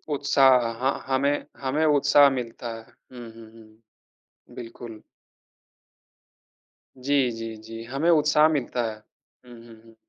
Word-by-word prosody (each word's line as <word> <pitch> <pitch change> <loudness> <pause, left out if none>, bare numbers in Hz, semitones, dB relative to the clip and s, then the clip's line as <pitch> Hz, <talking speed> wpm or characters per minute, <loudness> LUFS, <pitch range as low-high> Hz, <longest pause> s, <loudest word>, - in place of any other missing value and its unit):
उत्साह, 135 -4 +3
ह 130 - +1 0.2
हमें 140 +2 +1 0.2
हमें 140 +4 -1
उत्साह 145 -1 +4
मिलता 115 0 -7
है। 115 - -12
हुँ, 120 +1 -14
हुँ, 115 -1 -15
हुँ, 110 0 -21 0.6
बिल्कुल। 115 -1 -10 1.9
जी, 135 0 0
जी, 115 0 -7
जी, 115 +1 -10
हमें 135 +8 -2
उत्साह 150 -1 +4
मिलता 130 -5 -2
है। - - -10 0.5
हुँ, 120 -1 -14
हुँ, 115 -1 -16
हुँ। 115 0 -20
125 Hz, 125 wpm, -24 LUFS, 115-140 Hz, 1.9 s, उत्साह